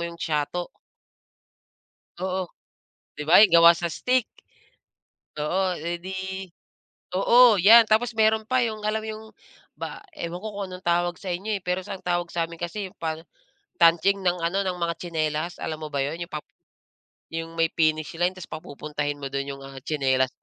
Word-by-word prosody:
'yong 170 - -10
siyato. 160 +2 -2 1.5
Oo, 185 -1 -2 0.7
'di 150 - -5
ba, 170 +6 +7
'yung 185 -6 +7
gawa 170 0 +9
sa 170 0 -3
stick. 250 +8 0 1.1
Oo. 180 +4 0
Eh, 170 +2 -4
'di 190 0 -5 0.7
oo, 235 +3 +6
'yan 225 +4 +9
tapos 220 +3 +2
meron 220 0 +3
pa, 255 0 +3
'yung 215 -1 -4
alam 215 +1 0
mo - - -6
'yung 215 0 -7 0.5
ba - - -6 0.2
ewan 175 -3 -5
ko 220 - -5
kung 200 -1 -4
anong 180 +1 -10
tawag 175 0 +1
sa 190 - -5
inyo, 205 +4 -2
eh, 195 - -12
pero 180 +1 -1
sa - - -5
ang - - -22
tawag 175 -1 0
sa'min 170 -1 -2
kasi 190 +3 -4
'yung - - -26
pan 160 -1 -3 0.6
tanching 175 +4 +4
ng 180 -1 +1
ano 190 +4 +1
ng 180 -1 -2
mga 170 -1 -1
tsinelas, 160 0 -2
alam 155 0 -4
mo 155 - -5
ba 140 - 0
'yon? 165 +4 -5
'Yung 170 - -5
pam - - -5 0.9
'yung 165 0 -4
may 165 0 +3
finish 155 -1 +1
line, 175 +1 +2
ta's 185 - -9
papupuntahin 145 -1 -5
mo 140 - -4
do'n 140 0 -2
'yung, 140 - -12
ah, 135 -1 -10
tsinela 130 -3 +1
175 Hz, 180 wpm, -25 LUFS, 160-195 Hz, 1.5 s, gawa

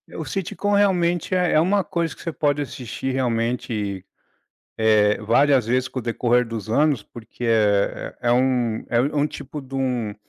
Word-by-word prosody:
O - - -5
sitcom 200 +2 -3
realmente 180 -3 +2
é 180 -2 +2
é 155 - +5
uma 195 +3 +2
coisa 170 -3 -2
que - - -14
você 165 - -4
pode 145 0 0
assistir, 130 0 -5
realmente, 115 -5 -2 0.7
eh, 105 -1 +3
várias 135 +2 +3
vezes 130 +2 +1
com 130 - -6
o - - -10
decorrer 120 +1 +1
dos 115 -1 -6
anos, 140 0 +2
porque 120 +3 -10
é 105 -3 +1
é 120 - -1
é - - +5
um 125 -3 +1
é 120 - +2
um 145 +3 0
um 150 - +2
tipo 150 0 -8
de 135 0 -12
um 125 -5 -1
125 Hz, 180 wpm, -22 LUFS, 115-150 Hz, 0.7 s, é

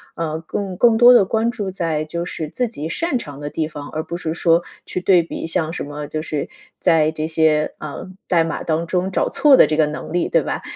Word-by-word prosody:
呃， 160 -1 -3
更- 195 0 -4
更 225 +3 +4
多 245 +1 +8
地 240 - +7
关 225 +4 0
注 205 -6 -4
在 165 -4 -2
就 170 +2 -4
是 160 -3 -5
自 250 +7 -1
己 160 -9 -6
擅 330 - -1
长 145 - -8
的 145 0 -5
地 155 0 -2
方， 145 -2 -8
而 155 0 -3
不 170 0 -5
是 160 -2 -3
说 170 0 +2 0.2
去 - - -3
对 180 -2 +4
比 165 - -6
像 165 -1 -1
什 - - -4
么， 145 0 -6
就 155 +1 -4
是 150 -3 -4 0.3
在 160 -3 +3
这 155 0 -3
些， 160 -1 +2
啊， 150 -2 -7 0.3
代 170 -2 +3
码 165 - -4
当 165 +1 -1
中 185 +2 -1
找 - - 0
错 290 -2 +5
的 - - +7
这 155 - -1
个 155 - +4
能 150 +1 -6
力， 175 0 0
对 - - +2
吧？ - - -3
165 Hz, 255 characters per minute, -20 LUFS, 155-185 Hz, 0.3 s, 多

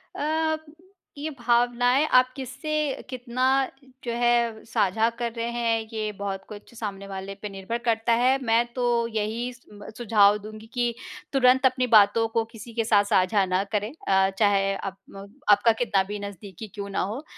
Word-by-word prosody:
अ, 315 +1 0 0.6
ये 305 +2 -4
भावनाएँ 245 +3 +3
आप 255 0 +7
किससे 265 +3 -6 0.4
कितना 255 0 -2 0.6
जो 240 - -3
है 235 -2 +2
साझा 220 0 +1
कर 235 -1 -1
रहे 230 - -1
हैं, 230 -2 -1
ये 215 -1 -2
बहुत 195 -1 -4
कुछ 210 +2 -11
सामने 200 -3 -6
वाले 195 0 -6
पे 210 - -5
निर्भर 195 +4 -4
करता 225 0 +2
है, 260 +2 +4
मैं 230 +1 +3
तो 250 -1 -1 0.2
यही 225 +3 -2
सुम्ब 210 -4 -15
सुझाव 210 -3 +4
दूँगी 215 +1 -10
कि 240 -1 0 0.4
तुरंत 260 0 +4
अपनी 255 -1 +2
बातों 225 +2 +4
को 225 - +3
किसी 230 +1 -10
के 230 - 0
साथ 205 -2 +4
साझा 190 +1 +3
ना 185 +1 0
करें 210 +3 -1 0.2
अ, 190 0 +4
चाहे 195 -2 +3
आप 195 0 -6
म 195 0 -10 0.2
आपका 205 +3 +5
कितना 200 -4 +2
भी 210 - -4
नज़दीकी 200 0 -8
क्यों 200 -1 -5
ना 195 - -1
हो। 225 - -4
अ, 300 - -12
225 Hz, 175 wpm, -25 LUFS, 200-245 Hz, 0.6 s, आप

